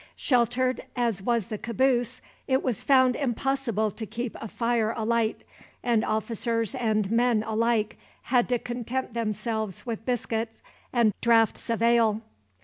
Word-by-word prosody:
Sheltered 250 0 +1
as 235 -6 0
was 235 0 +1
the 215 -3 -5
caboose, 245 0 0 0.3
it 265 -1 +2
was 245 -7 -1
found 260 -2 +4
impossible 250 -4 0
to 220 - -6
keep 240 +2 -4
a 225 - -4
fire 230 0 0
alight, 225 0 0 0.4
and 235 -3 +2
officers 230 +1 -1
and 215 -5 0
men, 230 -2 +3
alike, 220 0 0 0.2
had 245 -1 +2
to 245 - +2
content 245 +1 -4
themselves 220 -3 -2
with 225 -2 -4
biscuit 225 -2 -2 0.3
and 235 -4 +3
draughts 230 0 +3
of 230 0 0
ale. 230 -2 +3
230 Hz, 140 wpm, -27 LUFS, 220-245 Hz, 0.4 s, found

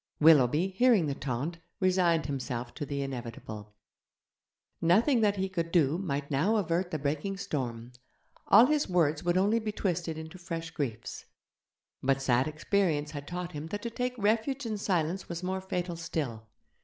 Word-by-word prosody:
Willoughby, 150 +2 +5
hearing 210 -2 +4
the 145 - -1
taunt, 140 +5 -3 0.2
resigned 180 -5 +3
himself 130 -3 -4
to 145 - -5
the 140 0 -2
inevitable. 115 -5 -7 1.1
Nothing 225 - +4
that 205 -2 +3
he 190 -1 -1
could 170 -3 -3
do 165 -1 +3
might 145 -6 -3
now 165 +11 +2
avert 175 -3 0
the 155 - -2
breaking 150 +7 -2
storm; 120 -9 -4 0.6
all 220 +4 +8
his 300 -2 +1
words 160 -4 +2
would 175 +1 +2
only 205 +5 +3
be 215 -1 -3
twisted 175 -5 -2
into 160 +3 -8
fresh 165 -2 -5
griefs. 125 -9 -4 0.8
But 135 +1 +2
sad 130 0 +2
experience 155 -1 0
had 145 -2 -7
taught 180 0 -4
him 150 0 -6
that 205 +4 -5
to 235 - -3
take 250 +1 -2
refuge 230 +6 +1
in 215 -2 -3
silence 180 -1 -1
was 170 +1 -5
more 190 +1 -2
fatal 180 -2 -3
still. 140 -9 -4
165 Hz, 165 wpm, -30 LUFS, 140-190 Hz, 1.1 s, all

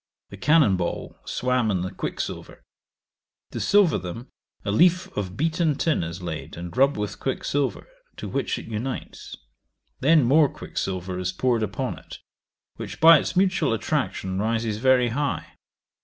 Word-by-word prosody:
The 100 - -9
cannon 135 - +4
ball 85 -1 -4
swam 125 -2 0
in 95 -4 0
the 95 - -3
quicksilver. - - -5 0.9
To - - -5
silver 200 -4 +4
them, 95 +7 -7 0.4
a 100 - 0
leaf 180 - +3
of 95 -1 -4
beaten 160 -1 +1
tin 160 - 0
is 85 +2 -6
laid, 80 -2 -6
and 85 +1 -7
rubbed 135 0 +3
with 105 -1 -4
quicksilver, 135 +1 -2 0.3
to - - -6
which - - -2
it - - -8
unites. 115 +4 -6 0.6
Then 155 +2 +5
more 145 +4 +5
quicksilver 95 -1 -4
is 90 0 -1
poured 120 +4 0
upon 110 +5 -3
it, - - -11 0.6
which, - - -7
by 165 -1 +8
its - - -4
mutual 185 -9 +2
[attraction] 110 -6 -2
rises 110 0 -1
very 125 0 +3
high. 145 +5 -2
120 Hz, 150 wpm, -24 LUFS, 95-145 Hz, 0.9 s, by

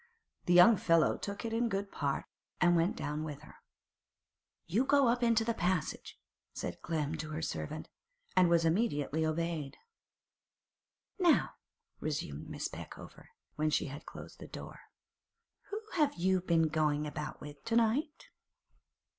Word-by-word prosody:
The 175 - +4
young 185 +5 +8
fellow 165 -3 +3
took 200 +3 -5
it 225 - -3
in 235 +1 +1
good 200 -1 -2
part, 140 -2 -1 0.3
and 175 -1 +5
went 170 +3 +2
down 150 +1 -3
with 150 -3 -6
her. - - -14 1.1
'You 205 +10 +2
go 280 -1 +4
up 240 +1 +2
into 230 -2 +3
the 230 - +1
passage,' 180 -5 -2 0.3
said - - -5
Clem 155 -2 -2
to 155 0 -5
her 155 +1 -4
servant, 155 0 -4 0.5
and 180 -2 +5
was 170 -1 +4
immediately 160 - +1
obeyed. 160 -2 -2 1.4
'Now,' 350 -4 +4 0.5
resumed - - -4
Miss - - -3
Peckover, - - -10 0.3
when 155 0 +2
she - - +1
had 145 - -10
closed - - -10
the - - -9
door, - - -9 0.9
'who 415 +1 -3
have 300 -5 +2
you 185 +1 +2
been 165 -2 +3
goin' 150 -1 +1
about 150 0 -5
with 145 -1 -10
to 230 - 0
night? 260 +8 +1
170 Hz, 145 wpm, -33 LUFS, 155-225 Hz, 1.4 s, young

